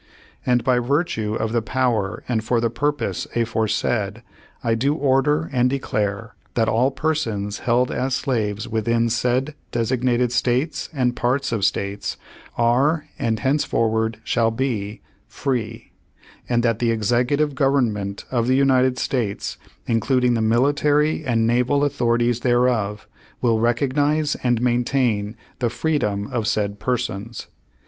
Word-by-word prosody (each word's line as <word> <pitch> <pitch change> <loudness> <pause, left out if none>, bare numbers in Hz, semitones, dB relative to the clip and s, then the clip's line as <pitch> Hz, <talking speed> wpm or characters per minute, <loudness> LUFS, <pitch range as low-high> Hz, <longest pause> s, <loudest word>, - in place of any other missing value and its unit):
"And, 125 -2 +3
by 125 0 +3
virtue 120 -5 0
of 110 0 -2
the 115 0 +1
power 115 -3 -1
and 115 -3 0
for 115 +1 +1
the 115 -1 0
purpose 145 +4 -1
afore^ 110 -2 0
said, 105 +1 -1 0.4
I 115 -2 +1
do 135 +6 +1
order 150 +2 +2
and 125 -1 +3
declare 110 -4 -2 0.2
that 115 -2 +2
all 120 +4 +3
persons 115 -10 -2
held 125 +1 +1
as 130 0 -1
slaves 110 -7 -1
within 115 +1 +1
said 125 +5 0 0.2
designated 120 +1 +1
States 125 +5 0
and 125 -5 0
parts 130 +2 0
of 110 -4 -1
States 100 +1 -1 0.4
are 135 +7 +2
and 110 -2 -1
henceforward 115 -5 +1
shall 115 -1 +2
be 115 -4 -3 0.3
free; 115 -4 -3 0.6
and 120 -1 +2
that 115 -2 +1
the 120 - +1
Executive 120 +7 +1
Gov 135 0 +2
ernment 100 0 -5
of 120 -2 +1
the 130 - +3
United 130 -1 +3
States, 115 -8 -2 0.3
including 125 +2 +2
the 115 - 0
military 145 +7 +2
and 115 -5 +1
naval 125 +5 +2
authorities 120 -4 +1
thereof, 120 -4 +1 0.3
will 115 -3 +2
recognize 145 +6 +1
and 120 -2 +1
maintain 120 -3 0 0.2
the 120 -2 +1
freedom 115 -8 -1
of 115 -3 -1
said 100 -1 -1
persons. 115 -3 -3
120 Hz, 135 wpm, -22 LUFS, 110-130 Hz, 0.6 s, And